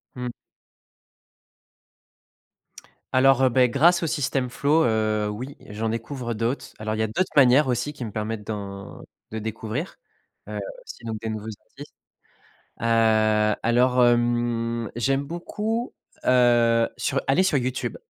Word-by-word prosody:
Mmh. 125 Hz, -1 st, -4 dB, 2.8 s
Alors, 135 Hz, 0 st, +5 dB
heu, 130 Hz, -, +5 dB
beh, 125 Hz, 0 st, +3 dB
grâce 170 Hz, +8 st, +4 dB
au 165 Hz, -, -1 dB
system 135 Hz, -4 st, -1 dB
flow, 150 Hz, +5 st, +2 dB
heu, 110 Hz, -2 st, +1 dB
oui, 125 Hz, +7 st, -6 dB
j'en 110 Hz, +2 st, -3 dB
découvre 120 Hz, +2 st, -4 dB
d'autres, 115 Hz, +5 st, -3 dB
alors 110 Hz, 0 st, -2 dB
il -, -, -5 dB
y 110 Hz, -, +1 dB
a -, -, 0 dB
d'autres 145 Hz, -, -1 dB
manières 135 Hz, +1 st, +6 dB
aussi 130 Hz, +4 st, -1 dB
qui 130 Hz, -, -7 dB
me 105 Hz, -, -6 dB
permettent 110 Hz, 0 st, -4 dB
d'en 100 Hz, -2 st, -7 dB, 0.3 s
de 110 Hz, -, -5 dB
découvrir, 110 Hz, -, -5 dB, 0.5 s
heu, -, -, -4 dB, 0.2 s
aussi 475 Hz, -, -11 dB
donc 110 Hz, -1 st, -4 dB
des 110 Hz, -, -4 dB
nouveaux 110 Hz, -1 st, -5 dB, 0.2 s
artistes, -, -, -13 dB, 0.9 s
heu, 110 Hz, -2 st, +3 dB
alors, 125 Hz, +2 st, +4 dB
hem, 120 Hz, -1 st, 0 dB
j'aime 135 Hz, +3 st, +1 dB
beaucoup, 210 Hz, -, -3 dB, 0.3 s
heu, 120 Hz, -2 st, +4 dB
sur 135 Hz, -1 st, -1 dB
aller 135 Hz, +7 st, +4 dB
sur 170 Hz, -6 st, +2 dB
YouTube, 130 Hz, 0 st, -2 dB
120 Hz, 140 wpm, -24 LUFS, 110-135 Hz, 2.8 s, manières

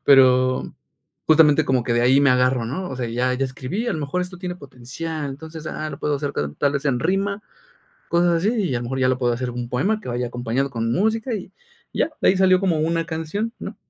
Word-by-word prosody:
pero, 130 Hz, -2 st, +4 dB, 0.5 s
justamente 155 Hz, -1 st, +5 dB
como 130 Hz, -3 st, +1 dB
que 120 Hz, -, 0 dB
de 120 Hz, -, +2 dB
ahí 130 Hz, +3 st, +5 dB
me 140 Hz, -, +4 dB
agarro, 125 Hz, -1 st, +2 dB
¿no? 180 Hz, +10 st, -4 dB
O 130 Hz, -, -5 dB
sea, 125 Hz, -2 st, -2 dB
ya 125 Hz, +2 st, 0 dB
ya 135 Hz, +2 st, 0 dB
escribí, 135 Hz, -, -4 dB
a -, -, 0 dB
lo 155 Hz, -, -3 dB
mejor 145 Hz, +5 st, -2 dB
esto 180 Hz, 0 st, -7 dB
tiene 180 Hz, -1 st, -4 dB
potencial, 140 Hz, +2 st, -6 dB
entonces, 160 Hz, +3 st, -9 dB
ah, 155 Hz, 0 st, -4 dB
lo 140 Hz, -, -8 dB
puedo 150 Hz, -1 st, 0 dB
hacer 145 Hz, 0 st, -3 dB
ta 75 Hz, 0 st, -2 dB
tal 140 Hz, -1 st, +2 dB
vez 140 Hz, 0 st, -2 dB
en 130 Hz, -3 st, +1 dB
rima, 195 Hz, +5 st, 0 dB, 0.7 s
cosas 175 Hz, 0 st, +3 dB
así 180 Hz, +6 st, +1 dB
y 195 Hz, -, 0 dB
a -, -, 0 dB
lo -, -, -5 dB
mejor 130 Hz, +2 st, -3 dB
ya 130 Hz, -, +3 dB
lo 130 Hz, -, +1 dB
puedo 120 Hz, -2 st, +1 dB
hacer 125 Hz, +1 st, -3 dB
un 120 Hz, 0 st, -5 dB
poema 195 Hz, -, 0 dB
que -, -, -10 dB
vaya 120 Hz, 0 st, -2 dB
acompañado 120 Hz, +3 st, -2 dB
con 115 Hz, -2 st, -2 dB
música 220 Hz, -, 0 dB
y 205 Hz, -4 st, -5 dB, 0.4 s
ya, -, -, +1 dB
de -, -, +5 dB
ahí 190 Hz, -, +3 dB
salió 185 Hz, -1 st, +5 dB
como 175 Hz, -5 st, +1 dB
una 165 Hz, +1 st, 0 dB
canción, 165 Hz, +7 st, -3 dB
¿no? -, -, -6 dB
140 Hz, 240 wpm, -22 LUFS, 125-175 Hz, 0.7 s, justamente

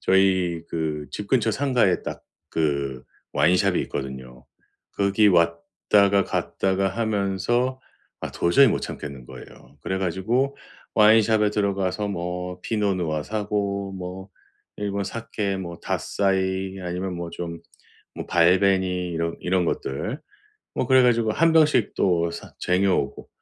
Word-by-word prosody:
저희 95 Hz, -3 st, +2 dB
그 75 Hz, -2 st, -3 dB
집 105 Hz, -, -6 dB
근처 115 Hz, -4 st, +2 dB
상가에 125 Hz, -7 st, +1 dB
딱 -, -, -6 dB, 0.3 s
그 70 Hz, -5 st, -1 dB, 0.3 s
와인숍이 90 Hz, +5 st, +3 dB
있거든요. 65 Hz, -2 st, -7 dB, 0.5 s
거기 100 Hz, +1 st, +3 dB
왔다가 95 Hz, +3 st, +2 dB
갔다가 95 Hz, 0 st, 0 dB
하면서 110 Hz, +4 st, -1 dB, 0.4 s
아 -, -, -4 dB
도저히 85 Hz, +11 st, +4 dB
못 -, -, 0 dB
참겠는 70 Hz, -4 st, -7 dB
거예요. 70 Hz, +4 st, -13 dB
그래 95 Hz, 0 st, -2 dB
가지고 115 Hz, +10 st, 0 dB, 0.4 s
와인숍에 110 Hz, 0 st, +5 dB
들어가서 100 Hz, -1 st, -1 dB
뭐 90 Hz, -1 st, -4 dB
피노 105 Hz, -3 st, 0 dB
누아 80 Hz, -4 st, -2 dB
사고, 100 Hz, -2 st, -2 dB
뭐 95 Hz, +1 st, -7 dB, 0.5 s
일본 100 Hz, -1 st, -2 dB
사케 105 Hz, -3 st, -3 dB
뭐 85 Hz, -2 st, -6 dB
닷사이 95 Hz, -1 st, -1 dB
아니면 90 Hz, +1 st, -3 dB
뭐 85 Hz, -1 st, -5 dB
좀 85 Hz, -1 st, -6 dB, 0.6 s
뭐 -, -, -5 dB
발베니 90 Hz, +1 st, +3 dB
이런 85 Hz, 0 st, -2 dB
이런 90 Hz, 0 st, +1 dB
것들. 95 Hz, -, -3 dB, 0.5 s
뭐 -, -, -1 dB
그래 130 Hz, -1 st, +6 dB
가지고 115 Hz, -3 st, +3 dB
1 165 Hz, +5 st, +3 dB
병씩 150 Hz, -8 st, +3 dB
또 85 Hz, -3 st, +1 dB
사 -, -, -9 dB
쟁여 95 Hz, +2 st, +2 dB
오고 -, -, -4 dB
95 Hz, 255 characters per minute, -24 LUFS, 85-105 Hz, 0.6 s, 그래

